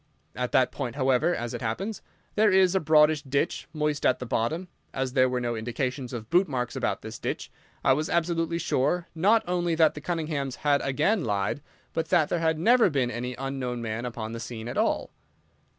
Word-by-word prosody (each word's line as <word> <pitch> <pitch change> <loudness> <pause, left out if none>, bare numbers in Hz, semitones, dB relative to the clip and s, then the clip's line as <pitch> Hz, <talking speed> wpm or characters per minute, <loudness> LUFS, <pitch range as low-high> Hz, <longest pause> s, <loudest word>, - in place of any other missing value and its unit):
At 125 0 -2
that 130 -1 +4
point, 125 -5 -4
however, 135 +5 +2
as 120 0 -4
it - - -5
happens, 190 - -3 0.3
there 215 0 +4
is 190 -1 +5
a 190 - +3
broadish 155 -1 +4
ditch, 140 +3 -1
moist 150 -2 -1
at 130 - +3
the 125 - -6
bottom. 140 +11 -1 0.3
As 130 -1 -2
there 130 -1 +4
were 125 0 -1
no 120 -1 -2
indications 125 +3 -3
of 115 -3 -7
bootmarks 135 -10 +1
about - - -2
this - - -7
ditch, - - -4 0.3
I 135 - +5
was 155 +5 -1
absolutely 170 -2 0
sure 170 +1 0
not 205 +8 +3
only 175 -2 0
that 160 -1 +4
the 150 - -8
Cunninghams 155 -5 -2
had 145 -1 +4
again 155 +10 +1
lied, 105 +4 -1 0.3
but 165 - -2
that 175 -5 +3
there 175 - 0
had 160 -1 +1
never 230 +5 +5
been 135 -5 0
any 125 +2 -4
unknown 130 -2 -4
man 110 +2 -3
upon 115 -2 -5
the 115 - -5
scene 115 -1 -6
at 120 - -5
all. - - 0
140 Hz, 200 wpm, -27 LUFS, 125-170 Hz, 0.3 s, is